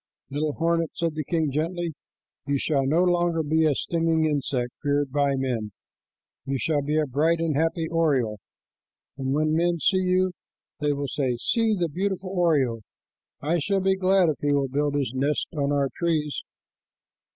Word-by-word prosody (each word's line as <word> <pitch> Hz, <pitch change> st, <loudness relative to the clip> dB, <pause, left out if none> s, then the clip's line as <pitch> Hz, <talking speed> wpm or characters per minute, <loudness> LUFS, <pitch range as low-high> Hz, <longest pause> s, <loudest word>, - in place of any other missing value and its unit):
"Little 150 Hz, +1 st, -1 dB
hornet," 165 Hz, 0 st, +1 dB
said 165 Hz, -2 st, -1 dB
the 155 Hz, 0 st, -3 dB
king 160 Hz, -1 st, 0 dB
gently, 165 Hz, +3 st, -2 dB, 0.5 s
"you 140 Hz, 0 st, +1 dB
shall 135 Hz, -1 st, 0 dB
no 165 Hz, +6 st, +3 dB
longer 175 Hz, -2 st, +2 dB
be 160 Hz, +2 st, +2 dB
a 145 Hz, -, +2 dB
stinging 165 Hz, 0 st, +1 dB
insect 135 Hz, -5 st, -1 dB
feared 145 Hz, -1 st, 0 dB
by 140 Hz, -1 st, +2 dB
men. 120 Hz, -6 st, -2 dB, 0.7 s
You 135 Hz, 0 st, -2 dB
shall 150 Hz, +2 st, 0 dB
be 150 Hz, +2 st, -1 dB
a 155 Hz, -, +2 dB
bright 155 Hz, +5 st, +1 dB
and 165 Hz, -3 st, 0 dB
happy 165 Hz, +2 st, 0 dB
oriole, 140 Hz, -10 st, +1 dB, 0.8 s
and 135 Hz, 0 st, -3 dB
when 155 Hz, +2 st, +1 dB
men 170 Hz, +1 st, +2 dB
see 190 Hz, -, +3 dB
you, 185 Hz, 0 st, +2 dB, 0.5 s
they 150 Hz, 0 st, +1 dB
will 140 Hz, 0 st, -2 dB
say, 130 Hz, -3 st, -1 dB
'See 225 Hz, -, +1 dB
the 175 Hz, -3 st, 0 dB
beautiful 190 Hz, +3 st, -3 dB
oriole. 150 Hz, -, +2 dB, 0.6 s
I 165 Hz, +4 st, +1 dB
shall 195 Hz, +6 st, 0 dB
be 190 Hz, 0 st, +2 dB
glad 190 Hz, -1 st, +3 dB
if 150 Hz, -, -2 dB
he 145 Hz, -, 0 dB
will 140 Hz, -2 st, +1 dB
build 145 Hz, +2 st, 0 dB
his 135 Hz, -4 st, -1 dB
nest 140 Hz, +3 st, 0 dB
on 140 Hz, -1 st, 0 dB
our 140 Hz, -1 st, +1 dB
trees.'" 155 Hz, -4 st, -1 dB
155 Hz, 175 wpm, -25 LUFS, 140-170 Hz, 0.8 s, no